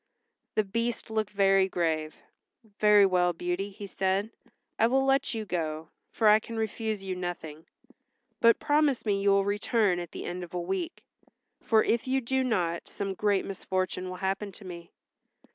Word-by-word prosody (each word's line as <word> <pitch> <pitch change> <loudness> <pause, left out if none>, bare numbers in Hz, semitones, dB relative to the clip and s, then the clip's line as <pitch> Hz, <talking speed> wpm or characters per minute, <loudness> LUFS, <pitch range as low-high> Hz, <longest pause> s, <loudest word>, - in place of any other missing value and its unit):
The 215 - +3
Beast 230 +3 -3
looked 220 -2 0
very 195 -1 +3
grave. 160 -3 -1 0.6
"Very 210 -1 +6
well, 180 -2 +2
Beauty," 180 +4 -3
he 200 +1 -9
said, 195 +2 -1 0.5
"I 225 - +5
will 265 +2 +2
let 270 -2 +1
you 220 -1 -3
go, 160 -3 -3 0.2
for 220 - +2
I 210 +1 +7
can 230 +1 -8
refuse 220 -2 -2
you 190 -1 -3
nothing. 165 -4 -6 0.7
But 230 0 +5
promise 290 -4 +1
me 200 -2 +1
you 200 - +3
will 195 0 +4
return 205 -2 +1
at 175 -1 -6
the - - -7
end 180 +1 -4
of 175 0 -9
a - - 0
week, 340 - -4 0.6
for 220 -1 +3
if 235 +2 0
you 265 +1 +2
do 265 +1 0
not 175 -9 -1
some 195 -1 -4
great 200 0 +1
misfortune 185 -1 -3
will 185 - -5
happen 195 +1 -2
to 200 - -12
me." 170 -2 -9
200 Hz, 175 wpm, -28 LUFS, 180-220 Hz, 0.7 s, I